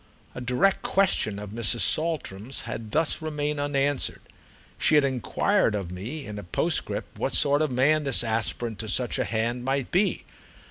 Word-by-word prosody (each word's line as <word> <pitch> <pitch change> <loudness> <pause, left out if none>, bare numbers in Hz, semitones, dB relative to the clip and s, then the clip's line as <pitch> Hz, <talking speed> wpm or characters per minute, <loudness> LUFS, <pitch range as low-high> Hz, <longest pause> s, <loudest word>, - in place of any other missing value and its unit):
A - - -7
direct 125 +11 +1
question 185 - +2
of 100 -1 -7
Mrs. 115 +1 +1
Saltram's 135 -8 0
had 110 -1 -6
thus 160 +6 +1
remained 150 -1 -2
unanswered—she 145 +2 -1
had 150 - +5
enquired 125 -5 +1
of 95 -4 -4
me 120 +12 -6
in 105 -1 -6
a - - -8
postscript 85 - -1
what - - -1
sort 145 +1 +4
of 155 - +1
man 140 +5 +2
this 135 -3 +2
aspirant 115 0 -2
to 110 -1 -5
such 120 +3 0
a - - +1
hand 115 +3 -1
might 135 0 -1
be. 195 +3 +1
130 Hz, 160 wpm, -26 LUFS, 110-150 Hz, -, had